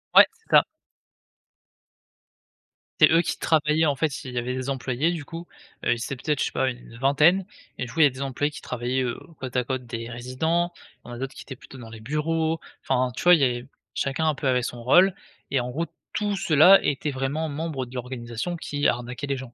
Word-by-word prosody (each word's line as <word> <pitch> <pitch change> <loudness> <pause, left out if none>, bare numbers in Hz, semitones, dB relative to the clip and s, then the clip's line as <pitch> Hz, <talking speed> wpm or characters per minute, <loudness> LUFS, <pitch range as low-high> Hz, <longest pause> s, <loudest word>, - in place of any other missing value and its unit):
Ouais - - +11
c'est 445 0 -32
ça. - - +8 2.4
C'est - - +8
eux 165 +1 +5
qui - - -3
travaillaient 155 0 +2
en 145 -2 +2
fait, 150 0 -2
il 130 - -5
il - - -10
y - - -3
avait 125 +1 -1
des 130 +1 -3
employés, 135 +4 0
du 165 -4 -4
coup, 165 +3 -8 0.4
heu, - - +4
ils - - -2
étaient 120 +3 -5
peut-être 145 +3 -1
je - - +2
sais - - -3
pas, 130 - 0
heu, 130 - +1
une 120 -1 -12
vingtaine 150 +8 +4 0.3
et 125 - -3
du 120 - -9
coup, 160 - +1
il - - +9
y - - +9
a 145 - +5
des 130 +1 -9
employés 140 +2 -1
qui - - -10
travaillaient, 125 +1 -2
heu, 120 - -2 0.2
côte 130 -1 -6
à 125 - +2
côte 130 +1 -4
des 115 0 -6
résidents, 160 +9 -1 0.3
il - - -13
y - - -8
en - - -6
a - - -7
d'autres 135 +2 -5
qui - - -10
étaient 135 - -8
plutôt 130 - -14
dans 115 -2 -10
les 115 -1 -11
bureaux, 160 +5 -1 0.2
enfin, 125 0 +1
tu - - -5
vois, 180 0 +8
il 160 - 0
y - - +6
avait 120 -1 -2 0.3
chacun 140 +4 -1
un 155 - +2
peu 140 - -3
avait 125 -1 +2
son 120 0 -5
rôle, 180 +9 +5 0.3
et 135 - +1
en 120 - -4
gros 160 +7 -2 0.3
tout 205 -1 -1
ceux 160 -5 0
là 185 +7 +9
étaient 145 +1 -1
vraiment 135 +4 -2
membre 150 -3 -3
de 125 +1 -13
l'organisation 125 +5 -4
qui 145 -2 -3
arnaquait 125 +4 -2
les 140 - -1
gens. 130 -2 -9
135 Hz, 250 wpm, -25 LUFS, 125-160 Hz, 2.4 s, Ouais